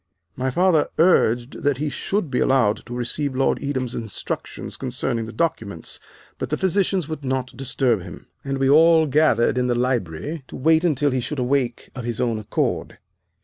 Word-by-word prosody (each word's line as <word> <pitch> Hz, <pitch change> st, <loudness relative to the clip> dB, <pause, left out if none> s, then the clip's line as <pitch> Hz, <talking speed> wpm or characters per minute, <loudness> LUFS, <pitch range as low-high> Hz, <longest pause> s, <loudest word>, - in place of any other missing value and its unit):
My 130 Hz, +1 st, -1 dB
father 170 Hz, +2 st, +3 dB
urged 125 Hz, -7 st, +3 dB
that 145 Hz, -2 st, +1 dB
he 150 Hz, +2 st, -2 dB
should 175 Hz, +2 st, -2 dB
be 125 Hz, -, +1 dB
allowed 120 Hz, -5 st, +3 dB
to 120 Hz, -, -6 dB
receive 130 Hz, +3 st, -2 dB
Lord 135 Hz, +1 st, +1 dB
Edam's 130 Hz, -4 st, -2 dB
instructions 110 Hz, -5 st, -5 dB
concerning 125 Hz, -3 st, -2 dB
the -, -, -7 dB
documents, 115 Hz, -, -3 dB, 0.4 s
but -, -, -3 dB
the -, -, 0 dB
physicians 190 Hz, -2 st, +1 dB
would 155 Hz, -2 st, -6 dB
not 130 Hz, -1 st, -2 dB
disturb 130 Hz, -4 st, 0 dB
him, -, -, -10 dB, 0.2 s
and 135 Hz, 0 st, -2 dB
we 135 Hz, 0 st, +1 dB
all 160 Hz, +3 st, +6 dB
gathered 145 Hz, -4 st, +3 dB
in 125 Hz, -, +1 dB
the 120 Hz, -, +1 dB
library 125 Hz, -, -2 dB
to -, -, -10 dB
wait 160 Hz, +4 st, +3 dB
until 145 Hz, -4 st, +2 dB
he 130 Hz, -1 st, 0 dB
should 150 Hz, +5 st, -4 dB
awake 125 Hz, -1 st, -1 dB
of 125 Hz, -, -6 dB
his 120 Hz, -1 st, -3 dB
own 115 Hz, -3 st, 0 dB
accord. 105 Hz, -, -2 dB
130 Hz, 180 wpm, -22 LUFS, 120-155 Hz, 0.4 s, all